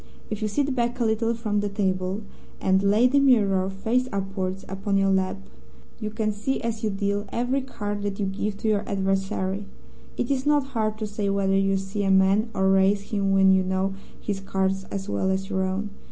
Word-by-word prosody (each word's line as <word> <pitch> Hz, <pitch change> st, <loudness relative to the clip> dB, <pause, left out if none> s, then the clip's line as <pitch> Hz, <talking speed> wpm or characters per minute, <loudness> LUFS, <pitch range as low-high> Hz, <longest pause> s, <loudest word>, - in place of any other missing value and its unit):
If 215 Hz, 0 st, -3 dB
you 215 Hz, -, +1 dB
sit 280 Hz, +5 st, 0 dB
back 240 Hz, -1 st, -1 dB
a 235 Hz, -, +2 dB
little 225 Hz, +1 st, +1 dB
from 215 Hz, -3 st, -1 dB
the 205 Hz, 0 st, -1 dB
table, 190 Hz, 0 st, -1 dB, 0.4 s
and 190 Hz, 0 st, +3 dB
lay 205 Hz, +4 st, +4 dB
the 270 Hz, +3 st, +4 dB
mirror, 200 Hz, -8 st, +3 dB
face 225 Hz, +6 st, 0 dB
upwards, 195 Hz, -1 st, -3 dB
upon 195 Hz, +1 st, -1 dB
your 195 Hz, 0 st, +3 dB
lap, 190 Hz, 0 st, +1 dB, 0.6 s
you 215 Hz, -2 st, -3 dB
can 215 Hz, 0 st, -1 dB
see, 215 Hz, +6 st, -2 dB
as 230 Hz, -2 st, -3 dB
you 215 Hz, -, +2 dB
deal, 200 Hz, +1 st, -1 dB
every 250 Hz, +3 st, 0 dB
card 205 Hz, -6 st, -4 dB
that 200 Hz, 0 st, -3 dB
you 200 Hz, -, +1 dB
give 200 Hz, +1 st, -2 dB
to -, -, -1 dB
your 210 Hz, -1 st, +2 dB
adversary. 195 Hz, 0 st, -1 dB, 0.5 s
It 245 Hz, -, -1 dB
is 265 Hz, -2 st, 0 dB
not 295 Hz, -2 st, +3 dB
hard 215 Hz, -2 st, 0 dB
to 215 Hz, -, -3 dB
say 205 Hz, -1 st, -2 dB
whether 195 Hz, -1 st, +1 dB
you 195 Hz, 0 st, +2 dB
see 195 Hz, +2 st, -3 dB
a 195 Hz, -, +1 dB
man 195 Hz, +4 st, +4 dB
or 190 Hz, 0 st, +3 dB
raise 195 Hz, +1 st, +2 dB
him 200 Hz, -2 st, +1 dB
when 195 Hz, 0 st, +5 dB
you 190 Hz, 0 st, +5 dB
know 190 Hz, +1 st, 0 dB, 0.3 s
his 200 Hz, -2 st, -3 dB
cards 190 Hz, 0 st, -1 dB
as 195 Hz, 0 st, -5 dB
well 190 Hz, -, 0 dB
as 190 Hz, +1 st, -1 dB
your 190 Hz, -1 st, 0 dB
own. 190 Hz, +2 st, -2 dB
200 Hz, 210 wpm, -25 LUFS, 195-215 Hz, 0.6 s, when